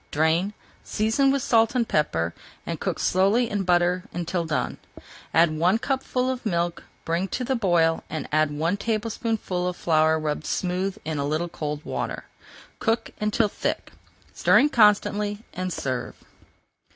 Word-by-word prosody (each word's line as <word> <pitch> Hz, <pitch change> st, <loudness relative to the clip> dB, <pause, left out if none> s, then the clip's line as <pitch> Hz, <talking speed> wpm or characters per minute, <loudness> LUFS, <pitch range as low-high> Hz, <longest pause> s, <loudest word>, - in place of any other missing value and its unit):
Drain, 160 Hz, +6 st, +1 dB, 0.3 s
season 225 Hz, +6 st, +1 dB
with 275 Hz, -1 st, +1 dB
salt 225 Hz, +1 st, +3 dB
and 235 Hz, -2 st, +1 dB
pepper, 85 Hz, -, 0 dB, 0.3 s
and -, -, -4 dB
cook -, -, -2 dB
slowly 200 Hz, +6 st, +2 dB
in 205 Hz, -2 st, -2 dB
butter 180 Hz, 0 st, +2 dB
until 175 Hz, 0 st, -2 dB
done. 155 Hz, -1 st, -2 dB, 0.5 s
Add 165 Hz, 0 st, +4 dB
one 175 Hz, +7 st, +3 dB
cupful 260 Hz, 0 st, -1 dB
of 255 Hz, -1 st, -5 dB
milk, 175 Hz, -5 st, -1 dB, 0.2 s
bring 170 Hz, +3 st, 0 dB
to 250 Hz, -, -3 dB
the 265 Hz, +2 st, 0 dB
boil, 175 Hz, -7 st, +2 dB
and 155 Hz, -3 st, -4 dB
add 155 Hz, 0 st, +3 dB
one 160 Hz, +6 st, -1 dB
tablespoonful 215 Hz, -4 st, -2 dB
of 180 Hz, -, -2 dB
flour 160 Hz, -1 st, +3 dB
rubbed 150 Hz, -1 st, -3 dB
smooth 185 Hz, +2 st, -1 dB
in 155 Hz, -2 st, -2 dB
a -, -, 0 dB
little 155 Hz, +4 st, -1 dB
cold 150 Hz, -2 st, -5 dB
water. -, -, -4 dB, 0.5 s
Cook 225 Hz, +1 st, 0 dB
until 210 Hz, +1 st, +2 dB
thick, -, -, -3 dB, 0.4 s
stirring 295 Hz, -, +4 dB
constantly, 210 Hz, -2 st, +3 dB
and 185 Hz, 0 st, -3 dB
serve. 130 Hz, -5 st, -3 dB
180 Hz, 150 wpm, -25 LUFS, 160-220 Hz, 0.5 s, Add